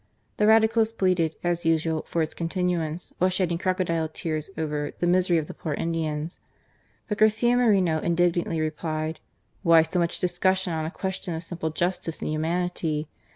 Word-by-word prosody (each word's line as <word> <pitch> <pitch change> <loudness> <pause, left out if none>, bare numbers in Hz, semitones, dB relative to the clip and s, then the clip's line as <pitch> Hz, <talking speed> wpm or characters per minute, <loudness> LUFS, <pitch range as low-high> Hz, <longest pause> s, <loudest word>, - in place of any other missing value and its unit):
The 210 - +3
Radicals 220 0 +4
pleaded, 180 -7 +1
as 175 -1 0
usual, 160 -1 +1
for 165 - 0
its 155 - -4
continuance 170 -1 -2
while 185 - +4
shedding 180 -2 0
crocodile 170 -4 0
tears 155 0 -4
over 150 -2 -2
"the 175 - -1
misery 180 0 +3
of 160 - 0
the - - -8
poor 155 -3 -4
Indians." 160 0 -2 0.7
But 210 -1 -3
Garcia 220 +3 +4
Moreno 195 -10 +3
indignantly 170 0 +1
replied, 155 0 -2 0.4
"Why 165 -3 +6
so 180 +2 -2
much 170 0 0
discussion 185 0 +1
on 160 -1 -2
a - - -2
question 190 -1 -4
of 160 - -5
simple 165 -1 -3
justice 170 0 -2
and - - -3
humanity? 160 -1 -1
170 Hz, 160 wpm, -26 LUFS, 160-185 Hz, 0.7 s, Why